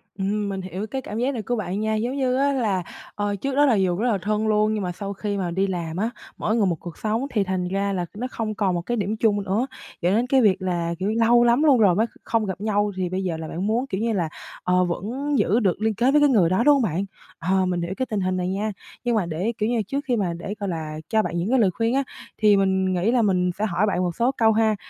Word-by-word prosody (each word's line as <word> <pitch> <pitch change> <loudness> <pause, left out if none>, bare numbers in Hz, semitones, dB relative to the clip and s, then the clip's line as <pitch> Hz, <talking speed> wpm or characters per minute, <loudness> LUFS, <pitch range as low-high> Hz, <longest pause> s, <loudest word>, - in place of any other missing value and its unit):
Ừm 200 +1 -1
mình 195 -1 -3
hiểu 190 +3 -5
cái 265 +2 -4
cảm 215 -3 -6
giác 255 +4 0
này 230 - -3
của 245 +4 -2
bạn 195 -2 -3
nha. 220 0 0
Giống 240 +5 -1
như 255 -2 +1
á 280 +1 +2
là, 210 -8 0 0.3
ờ, 205 0 -1
trước 270 +7 -3
đó 290 +1 +5
là 255 - +4
dù 185 -3 +1
rất 230 +6 0
là 205 - +1
thân 215 +1 0
luôn 215 0 +2
nhưng 210 - -2
mà 180 - -2
sau 200 +2 -5
khi 205 0 -3
mà 180 -3 -2
đi 190 +3 +1
làm 170 -3 -3
á, 220 +4 0 0.3
mỗi 220 - 0
người 215 -4 +3
một 175 - +1
cuộc 175 -2 -9
sống 220 +4 -1
thì 210 -4 +2
thành 185 -1 -2
ra 195 +1 -1
là 180 -2 -1
nó 250 +3 -2
không 215 -2 -3
còn 195 -4 +1
một 175 - -1
cái 240 +7 -2
điểm 210 +1 -1
chung 205 -3 +2
nữa, 210 +8 0 0.3
dẫn 180 +4 +2
đến 240 +2 +1
cái 265 0 +4
việc 195 -3 +3
là, 170 -2 -1
kiểu 195 +3 0
như, 220 - -2
lâu 240 +1 +5
lắm 240 +5 +4
luôn 280 -5 +6
rồi 190 -5 +5
mới 220 +3 +3 0.2
không 225 -2 0
gặp 190 0 -5
nhau 205 -1 +1
thì 180 -2 -1
bây 190 +1 -2
giờ 170 -3 -2
là 160 - -6
bạn 180 +6 -3
muốn, 240 +5 0
kiểu 195 -3 -3
như 230 -1 0
là, 170 -5 -1 0.3
ờ, 180 0 +3
vẫn 250 +12 -2
giữ 225 +5 +3
được 195 -2 0
liên 220 0 +1
kết 245 +5 +3
với 295 +1 +4
cái 290 - +5
người 190 -10 +4
đó, 190 +6 +2
đúng 295 +1 +6
hông 275 - +3
bạn? 190 -1 -1 0.3
Ờ, 185 +2 +1
mình 180 -1 -1
hiểu 170 +3 -3
cái 260 - 0
tình 210 -4 -2
hình 185 0 0
này 180 - -1
nha, 210 +3 -1 0.3
nhưng 240 -2 +1
mà 205 - +1
để, 175 +8 -2
kiểu 215 +2 0
như 245 - +1
là, 225 - +1
trước 280 +2 -3
khi 245 - +2
mà 190 -6 -1
để, 175 +4 -5
gọi 200 -2 -2
là, 155 -2 -4
cho 220 -1 +3
bạn 175 - -3
những 180 +6 -1
cái 260 -1 +3
lời 195 -4 +4
khuyên 230 +5 0
á 275 - +2 0.3
thì 210 -2 +5
mình 190 -1 +1
nghĩ 185 +6 +1
là 245 -1 +3
mình 180 -3 +2
sẽ 215 - +1
hỏi 195 +1 +1
bạn 185 -3 0
một 175 -2 -2
số 240 +3 +2
câu 225 -1 +4
ha. 220 0 +2
205 Hz, 300 wpm, -23 LUFS, 185-230 Hz, 0.3 s, luôn